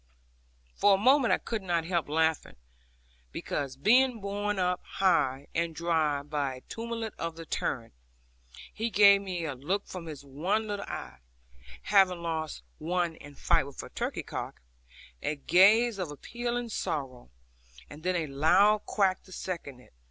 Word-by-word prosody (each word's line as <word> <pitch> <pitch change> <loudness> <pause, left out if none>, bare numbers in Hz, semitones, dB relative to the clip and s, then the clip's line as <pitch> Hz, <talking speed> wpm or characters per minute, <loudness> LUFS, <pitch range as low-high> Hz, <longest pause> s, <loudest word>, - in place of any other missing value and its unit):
For 200 - +4
a - - -1
moment 260 +4 +4
I - - +4
could 225 -2 -4
not 170 -3 -1
help 170 -4 -1
laughing, 160 0 0 0.8
because, 135 - -4
being 245 - +4
borne 205 +1 -2
up 180 -1 0
high 140 -8 +1
and 165 -1 -1
dry 155 -4 +1
by 145 -3 -2
a 130 - -12
tumult 230 - -5
of 165 -1 -3
the 165 0 -9
torrent, 115 - -3 0.8
he 225 +2 -2
gave 200 -1 +6
me 180 -4 -4
a 145 - -3
look 175 +11 -2
from 175 -3 -8
his 145 -3 -8
one 180 +11 -1
little 205 -1 -4
eye 65 -2 -7 0.6
(having 185 -4 +3
lost 160 -2 -3 0.2
one 175 +1 -1
in 145 0 -13
fight 135 - +2
with 140 - -12
the - - -7
turkey - - -3
cock), - - -6 0.6
a 150 - -1
gaze 200 - +4
of 180 -4 -3
appealing 240 - -4
sorrow, 135 - -4 0.6
and 145 - -12
then 180 +2 0
a 170 -2 0
loud 180 +9 +3
quack 195 -3 +1
to 185 - -16
second 170 -9 -6
it. 125 - -20
175 Hz, 160 wpm, -29 LUFS, 150-205 Hz, 0.8 s, gave